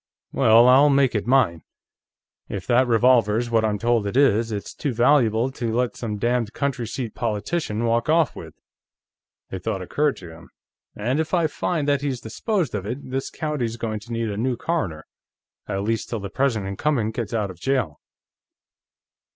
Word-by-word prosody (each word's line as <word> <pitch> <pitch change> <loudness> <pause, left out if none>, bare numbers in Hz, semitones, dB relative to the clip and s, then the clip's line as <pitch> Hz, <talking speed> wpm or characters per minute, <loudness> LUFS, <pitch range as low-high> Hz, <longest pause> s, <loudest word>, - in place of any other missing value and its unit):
"Well, 115 -2 +5
I'll 135 +3 +6
make 140 -2 +3
it 105 0 -2
mine. 120 -11 +3 0.9
If 95 -3 -5
that 125 +1 +3
revolver's 120 -1 +3
what 115 -1 +3
I'm 105 -1 0
told 115 -1 +1
it 100 - -2
is, 115 -5 +3
it's 105 -2 -5
too 140 - -3
valuable 120 -1 +3
to 120 -3 -3
let 125 +1 0
some 110 -3 -4
damned 120 0 0
county 135 -5 -2
seat 115 0 -5
politician 115 +1 -2
walk 115 +3 +1
off 160 -1 +3
with." 80 -2 -10 1.0
A 95 - -4
thought 95 +1 -3
occurred 145 +9 0
to 85 -3 -10
him. 80 +1 -14 0.5
"And 125 +8 -1
if 160 +3 0
I 170 -2 +2
find 155 0 -2
that 140 -1 +2
he's 135 -4 -2
disposed 170 - -2
of 100 -3 -3
it, 130 +3 -6
this 135 +1 -2
county's 135 -7 -3
going 110 -2 -3
to 115 +3 -13
need 115 -2 -2
a 100 - -5
new 125 +2 -1
coroner, 95 - -2 0.6
at 100 0 -2
least 115 +1 -2
till 115 - -3
the 100 -1 -7
present 125 -6 0
incumbent 110 +3 -1
gets 115 -2 -4
out 105 -3 -1
of 90 - -14
jail." 115 - -1
120 Hz, 180 wpm, -23 LUFS, 105-135 Hz, 1.0 s, I'll